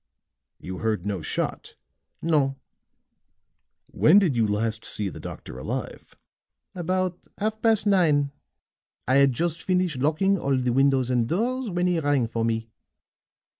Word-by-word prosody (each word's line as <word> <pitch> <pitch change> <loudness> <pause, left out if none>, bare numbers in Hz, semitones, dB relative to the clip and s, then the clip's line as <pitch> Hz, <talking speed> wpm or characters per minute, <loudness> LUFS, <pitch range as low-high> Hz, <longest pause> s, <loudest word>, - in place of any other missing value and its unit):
"You 95 0 -7
heard 110 -5 -1
no 100 -4 -2
shot?" 75 - -4 0.5
"No." 145 -5 +2 1.4
"When 170 +6 +5
did 180 -10 +3
you 115 -2 +2
last 110 +1 -1
see 105 -2 -2
the - - -10
doctor 60 - -8
alive?" - - -6 0.6
"About 185 0 -2
half 220 +1 -2
past 220 -2 +3
nine. 155 -8 +3 0.8
I 130 - +4
had 140 -1 +5
just 170 +5 -1
finished 180 -6 0
locking 165 +8 +2
all 135 -3 +1
the 125 -1 0
windows 135 -1 +2
and 120 -2 +1
doors 240 +7 -1
when 175 -1 0
he 180 -2 +1
rang 145 -5 +1
for 115 0 -3
me." 115 0 -2
140 Hz, 140 wpm, -25 LUFS, 115-180 Hz, 1.4 s, When